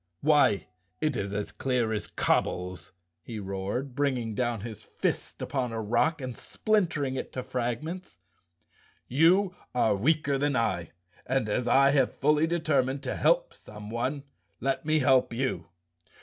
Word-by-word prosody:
" 85 - -50
Why, 145 - +4 0.3
it 155 -3 0
is 100 -3 -2
as 105 0 -3
clear 125 -4 0
as 105 - -3
cobbles," 90 0 -1 0.3
he 110 +6 -7
roared, 100 +7 -3
bringing 130 -5 0
down 120 -1 -1
his 110 -1 -7
fist - - -3
upon 130 -3 -2
a 115 - -3
rock 120 +9 +1
and 130 -2 -5
splintering 170 -11 0
it - - -5
to 130 - -3
frag¬ 125 -1 -2
ments. 180 +3 -7 0.9
"You 180 +7 +4 0.2
are 110 -4 +3
weaker 140 +5 +1
than 145 -1 +1
I 85 -9 0 0.4
and, 130 -3 +1
as 120 +4 -1
I 135 +1 +5
have 135 -3 +2
fully 150 +3 +3
determined 145 -5 +1
to - - -2
help - - +2
someone, 120 - -5 0.4
let 135 +3 -1
me 155 0 +4
help 130 -3 +4
you. 115 -10 -2
130 Hz, 150 wpm, -28 LUFS, 115-150 Hz, 0.9 s, I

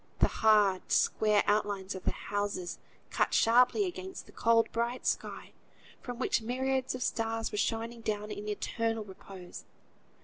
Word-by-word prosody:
The - - +4
hard, 210 -4 +3
square 210 -1 +3
outlines 205 -2 0
of 190 - -8
the - - +2
houses 205 -3 -3 0.3
cut - - +1
sharply 250 - +4
against 370 +1 -6
the - - -16
cold 230 0 +3
bright 235 +2 -2
sky, - - -2 0.5
from 245 -1 -6
which 245 - +1
myriads 260 +2 -1
of 250 - -3
stars 225 0 -1
were 210 - -2
shining 230 +1 -2
down 210 -1 -3
in 210 0 -6
eternal 225 +1 -2
repose. 190 -2 -11
225 Hz, 145 wpm, -31 LUFS, 205-240 Hz, 0.5 s, The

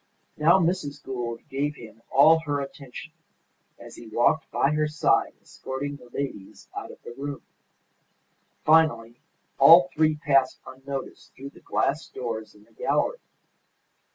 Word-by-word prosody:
Now, 160 +4 +5
Mrs. 165 -5 -1
Gould 120 -3 -5
gave 145 +2 -2
him 115 -3 -13
all 160 +4 +6
her 145 -3 -2
attention 140 +2 -9 0.6
as - - -13
he 120 - -11
walked 120 +8 +1
by 140 - +1
her 150 0 +1
side 150 +1 +1
escorting 140 +2 -6
the 125 - -17
ladies 120 -7 -6
out - - -6
of - - -12
the - - -9
room. 140 +1 -6 1.2
Finally 125 -8 +3 0.4
all 170 +6 +8
three 155 0 +2
passed 135 -3 +1
unnoticed 135 +1 -8
through 135 +1 -9
the - - -17
glass 145 +4 -1
doors 110 -3 -6
in 105 - -19
the 115 - -27
gallery. - - -1
140 Hz, 140 wpm, -25 LUFS, 125-155 Hz, 1.2 s, all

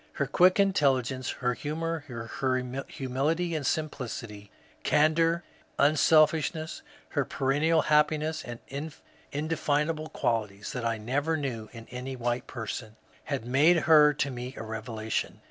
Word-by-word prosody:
Her - - 0
quick 185 +2 +4
intelligence, 135 -9 +2
her 125 -1 -1
humour, 160 +3 -3
her 115 -3 -7 0.6
humility 150 +7 -1
and 155 -2 -2
simplicity, 120 -8 -3 0.3
candour, 165 +3 +3 0.3
unselfishness, 155 +1 +3 0.3
her - - 0
perennial 150 +4 +1
happiness, 155 +1 +2
and 120 -1 -7 0.7
indefinable 155 +1 -1
qualities 105 -8 -2
that 125 -2 -4
I 115 -1 0
neVer 140 +9 -1
knew 120 -7 -4
in 115 -1 -11
any 125 +1 -5
white 120 0 -2
per 115 -3 -6
son, 110 0 -6 0.3
had 140 -6 -3
made 145 +8 +5
her 150 -2 +7
to 140 -1 -1
me 125 +1 -6
a - - -5
revelation. 110 0 -3
140 Hz, 130 wpm, -28 LUFS, 120-155 Hz, 0.7 s, her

